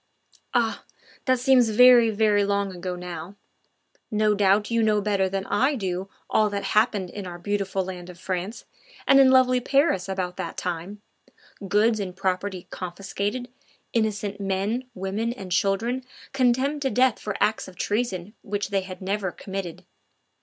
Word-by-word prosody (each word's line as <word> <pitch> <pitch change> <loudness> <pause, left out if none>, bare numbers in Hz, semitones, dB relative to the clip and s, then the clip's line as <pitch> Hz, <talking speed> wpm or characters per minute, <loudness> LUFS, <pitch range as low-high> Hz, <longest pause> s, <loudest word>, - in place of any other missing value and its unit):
Ah! 230 -2 +1 0.4
that 255 -1 +3
seems 250 -2 +4
very, 240 +1 +7
very 210 -1 +3
long 200 -1 -1
ago 180 +1 -4
now. 180 +1 -7 0.7
No 215 -1 +2
doubt 205 +2 +2
you 230 0 +2
know 215 -1 +3
better 200 -2 +1
than 195 0 -3
I 265 +7 +2
do 190 -4 -3 0.2
all 215 -1 +3
that 200 -1 -3
happened 210 -4 +2
in 200 -2 -6
our 175 -1 -7
beautiful 195 0 -1
land 180 -1 -7
of 175 -1 -11
France 185 +4 -4 0.4
and 275 - +6
in 270 -1 +7
lovely 255 -1 +5
Paris 250 - +1
about 185 -2 -3
that - - -5
time: 180 +4 -4 0.6
goods 215 +3 +3
and 185 -3 -4
property 190 -1 -2
confiscated, 200 +6 -4 0.5
innocent 210 -3 -1
men, 200 +6 -1
women, 200 +5 -2
and 190 -6 -9
children 205 +8 +1 0.3
condemned 265 +3 +2
to 270 - +1
death 255 +1 +3
for 210 -2 -4
acts 215 - +1
of 185 - -12
treason 205 -1 -2
which 205 -1 -3
they 200 -1 +1
had 185 0 -9
never 195 -1 -1
committed. 190 -3 -6
205 Hz, 155 wpm, -25 LUFS, 190-230 Hz, 0.7 s, very